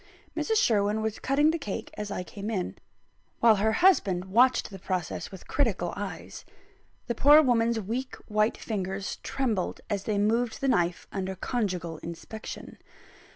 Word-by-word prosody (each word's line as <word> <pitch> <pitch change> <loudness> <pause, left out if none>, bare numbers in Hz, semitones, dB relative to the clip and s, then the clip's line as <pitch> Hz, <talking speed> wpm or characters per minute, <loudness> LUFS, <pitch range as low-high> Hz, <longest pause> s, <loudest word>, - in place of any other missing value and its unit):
Mrs. 445 - 0
Sherwin 215 - +2
was 220 -1 -2
cutting 290 +3 +3
the 330 - -2
cake 210 -9 -5
as 210 -1 -5
I 190 -2 -3
came 200 +3 -7
in, 190 -5 -2 0.6
while 225 -2 +6
her 220 +2 +2
husband 190 - +4
watched 240 +5 +3
the 195 - -8
process 180 -3 -3
with 190 -2 -12
critical 205 -11 0
eyes. 200 0 -6 0.6
The 235 - -1
poor 290 +6 +7
woman's 235 -3 +2
weak 235 +6 -4
white 215 +1 +1
fingers 195 -2 -3
trembled 230 -9 -2
as 200 -1 -1
they 210 -2 0
moved 225 +3 +1
the 275 - -1
knife 175 -8 +1
under 190 -1 -3
conjugal 180 -7 -2
inspection. 170 +6 -8
210 Hz, 155 wpm, -28 LUFS, 190-235 Hz, 0.6 s, poor